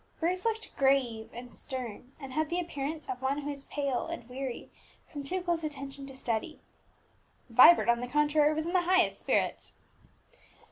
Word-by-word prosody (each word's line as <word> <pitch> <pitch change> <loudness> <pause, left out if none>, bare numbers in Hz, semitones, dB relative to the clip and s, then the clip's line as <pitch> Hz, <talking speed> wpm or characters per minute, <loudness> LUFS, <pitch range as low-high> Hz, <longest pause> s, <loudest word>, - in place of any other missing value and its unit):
Bruce 360 +4 -1
looked 450 -1 -2
grave 260 -5 +2
and 245 +1 -9
stern, 255 -2 -6
and 270 -3 -8
had 310 +1 0
the 350 - 0
appearance 310 -2 -4
of 250 - -4
one 265 +2 0
who 290 +1 -3
is 280 -1 -7
pale 280 -4 -2
and 230 - -6
weary 255 0 -6 0.4
from 290 -2 -5
too 365 +6 -2
close 340 -2 0
attention 275 -2 -6
to 270 - -10
study. 255 +4 -3 0.9
Vibert, 255 +8 +8
on 235 0 +4
the 245 - -4
contrary, 295 +2 +3
was 310 +1 -1
in 345 - -3
the 365 - +4
highest 365 +1 +3
spirits. - - -1
280 Hz, 175 wpm, -30 LUFS, 255-315 Hz, 0.9 s, Vibert